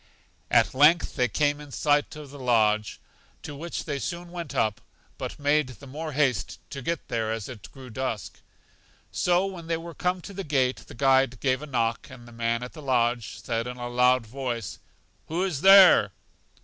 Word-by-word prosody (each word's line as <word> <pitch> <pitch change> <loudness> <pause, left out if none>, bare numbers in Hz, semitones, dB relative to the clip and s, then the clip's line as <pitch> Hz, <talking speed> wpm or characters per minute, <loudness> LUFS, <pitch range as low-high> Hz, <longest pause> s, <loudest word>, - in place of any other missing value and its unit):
At - - +3
length 150 +5 +4
they 125 -3 +2
came 145 +4 0
in 145 - -11
sight 145 +2 +1
of 150 -3 -10
the 145 - -11
lodge, 110 -4 +1 0.4
to 145 - -7
which 165 +4 -5
they 145 -3 -3
soon 175 +3 -5
went 170 -3 -6
up, 110 -1 0 0.4
but - - -5
made 145 0 +2
the 130 0 -12
more 155 +3 -6
haste 130 -10 0
to 140 - -6
get 165 +5 -3
there 110 -1 -1
as 110 -2 -4
it 120 -6 -10
grew 130 -3 -12
dusk. 115 -4 -4 0.7
So 180 +1 +2
when 180 -4 -7
they 165 -1 0
were 170 +1 -8
come 180 +2 -1
to 200 - -10
the 195 +1 -5
gate 130 -5 +1
the - - -12
guide 130 -2 +3
gave 130 0 0
a 150 - -7
knock, 115 -4 -1
and 120 -2 -13
the - - -13
man 115 +1 -1
at 125 - -8
the 155 - -10
lodge 120 -4 0
said 115 0 -2
in 125 0 -6
a 120 0 -5
loud 125 0 +3
voice, 120 -3 -5 0.5
Who 170 +4 -1
is 170 -8 -2
there? 190 - +8
135 Hz, 195 wpm, -26 LUFS, 120-155 Hz, 0.7 s, there